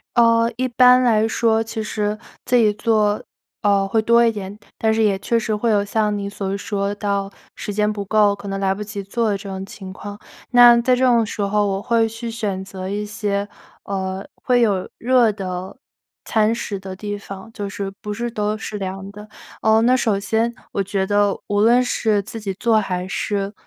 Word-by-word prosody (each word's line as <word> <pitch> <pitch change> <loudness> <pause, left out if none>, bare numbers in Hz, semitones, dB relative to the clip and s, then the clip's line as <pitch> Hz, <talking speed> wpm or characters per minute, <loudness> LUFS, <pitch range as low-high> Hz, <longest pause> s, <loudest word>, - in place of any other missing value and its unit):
呃， 230 -1 +4
一 255 +2 -1
般 250 +1 +6
来 220 -3 +3
说， 225 0 +2
其 225 0 -4
实 210 0 -2 0.3
自 245 - +1
己 225 -3 +5
做， 210 -1 +1 0.4
呃， 200 -1 +3
会 220 +3 +1
多 235 +2 +4
一 230 - +3
点， 205 -1 -7 0.2
但 220 0 +2
是 220 0 +2
也 200 -3 +2
确 230 +4 0
实 225 -1 -1
会 215 +2 0
有 205 -1 +3
像 210 0 0
你 200 0 -4
所 195 -1 -3
说 200 0 -2
到 200 -1 -2 0.3
时 205 - -5
间 210 +1 +1
不 205 -1 -5
够， 210 0 +3
可 200 0 -9
能 195 0 -3
来 190 -1 +2
不 200 - -8
及 210 -1 -5
做 225 +3 -1
的 200 - 0
这 195 0 -9
种 190 0 -5
情 195 -1 -10
况。 205 +2 -8 0.3
那 240 -1 +8
在 250 +1 +3
这 255 - 0
种 235 -3 +4
时 210 0 -5
候， 205 +1 +1
我 195 0 -2
会 230 0 +2
去 230 +1 -6
选 205 -4 -3
择 190 -1 -7
一 205 +1 -2
些， 205 -1 -2 0.4
呃， 190 0 -4 0.2
会 250 -1 +2
有 200 -5 +1
热 240 -2 +3
的 185 -2 -5 0.5
餐 220 0 +2
食 205 -3 -4
的 190 0 -7
地 205 +1 -5
方， 195 +1 -10
就 205 -3 -5
是 195 0 -5
不 210 - -4
是 235 +3 -3
都 210 -1 -1
是 215 -1 -6
凉 195 0 -5
的。 210 +1 -11 0.3
哦， 220 0 +4
那 250 +3 +4
首 220 -5 +1
先， 225 +4 0 0.2
我 200 - -1
觉 195 0 -1
得 205 0 +2
无 205 0 0
论 235 +4 +5
是 220 -4 +1
自 220 +3 -8
己 200 -3 -4
做 225 +3 +2
还 180 -3 -3
是 200 +1 -2
210 Hz, 225 characters per minute, -21 LUFS, 200-225 Hz, 0.5 s, 那